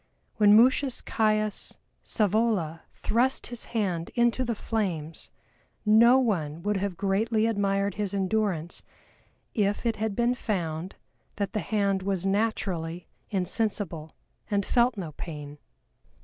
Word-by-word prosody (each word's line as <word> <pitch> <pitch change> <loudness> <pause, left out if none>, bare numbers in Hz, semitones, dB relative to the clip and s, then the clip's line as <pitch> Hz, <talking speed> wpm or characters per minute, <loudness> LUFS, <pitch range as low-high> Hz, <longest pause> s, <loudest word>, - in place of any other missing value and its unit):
When 210 -1 +7
MUTIUS 255 +2 +3
CAIUS 215 -1 0 0.3
SCAEVOLA 205 -7 +1
thrust 250 +4 +1
his 240 - -7
hand 185 -7 -2
into 240 +1 +2
the 235 -2 -2
flames 175 -9 -3 0.6
no 230 +4 +7
one 170 - -1
would 205 -1 +1
have 190 -2 -2
greatly 215 +3 +1
admired 200 -2 +1
his 205 -1 -2
endurance 195 -4 -1 0.7
if 205 0 0
it 230 -1 +1
had 215 -1 -2
been 240 +2 +2
found 180 -7 -3 0.4
that 200 -2 -3
the 215 - 0
hand 200 -3 0
was 190 -1 -1
naturally 190 -5 -1 0.2
insensible 190 -5 -2 0.3
and 200 -2 +1
felt 240 -1 +2
no 170 -5 -5
pain. 150 -1 -8
205 Hz, 120 wpm, -27 LUFS, 180-225 Hz, 0.7 s, When